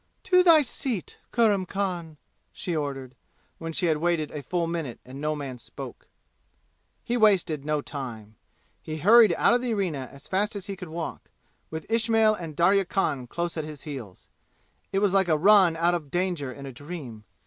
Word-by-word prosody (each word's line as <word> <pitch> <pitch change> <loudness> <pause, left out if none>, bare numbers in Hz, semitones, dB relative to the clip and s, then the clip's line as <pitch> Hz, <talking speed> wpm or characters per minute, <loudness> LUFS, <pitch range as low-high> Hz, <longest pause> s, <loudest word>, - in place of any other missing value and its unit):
"To 365 -1 +5
thy 330 -4 +7
seat, 245 -6 -3
Kurram 205 -6 +2
Khan!" 175 -6 -3 0.3
she 175 - -4
ordered, 135 -4 -4 0.5
when 165 0 -5
she 170 - -1
had 160 -2 +2
waited 165 -2 0
a 150 - -5
full 170 +5 -1
minute 165 -7 -4
and 130 +3 -9
no 155 0 0
man 135 -4 -6
spoke. - - -9 1.0
He 240 - -1
wasted 190 - +3
no 150 0 0
time. 115 -7 -7 0.5
He 155 0 -5
hurried 210 +3 +6
out - - +4
of 245 - +2
the 240 -3 -1
arena 155 -10 -2
as 140 +1 -12
fast 205 +3 0
as 200 -2 -5
he 200 -1 -5
could 180 -3 -9
walk, 165 0 -6 0.4
with 160 0 -6
Ismail 225 -1 +3
and 165 -7 -6
Darya 190 +4 +4
Khan 150 -9 -1
close 170 +6 -3
at 160 - -1
his 150 -2 -9
heels. 130 - -8 0.6
It 195 +1 +1
was 195 - +1
like 195 -2 +3
a 155 -2 +3
run 185 -1 +5
out 170 +1 +3
of 160 -5 -3
danger 175 -5 -1
in 140 +1 -9
a 135 - -6
dream. 130 -6 -8
170 Hz, 185 wpm, -26 LUFS, 145-195 Hz, 1.0 s, thy